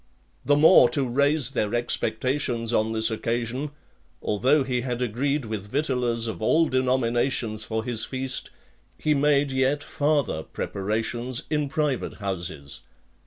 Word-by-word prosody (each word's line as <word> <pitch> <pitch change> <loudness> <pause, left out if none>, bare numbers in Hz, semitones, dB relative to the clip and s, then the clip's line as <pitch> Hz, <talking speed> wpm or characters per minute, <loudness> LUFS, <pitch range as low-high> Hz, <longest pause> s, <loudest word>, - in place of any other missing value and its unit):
The 145 - +3
more 150 -4 +7
to 135 -2 +1
raise 140 +1 +1
their 110 -4 -1
expectations 120 0 -1
on 110 0 +2
this 110 +1 +2
occasion, 120 +5 -2 0.5
although 130 +8 +2
he 125 -2 -1
had 125 -1 -3
agreed 130 +4 -1
with 105 -2 -5
victuallers 125 -4 0
of 110 -5 -4
all 160 +9 +3
denominations 120 -3 0
for 110 0 -2
his 120 -3 0
feast, 130 0 -4 0.5
he 155 - +1
made 145 -1 +2
yet 130 +2 +1
farther 145 - 0
preparations 110 +8 -3
in 150 -2 0
private 145 -3 -1
houses. 85 -8 -5
125 Hz, 130 wpm, -25 LUFS, 110-140 Hz, 0.5 s, more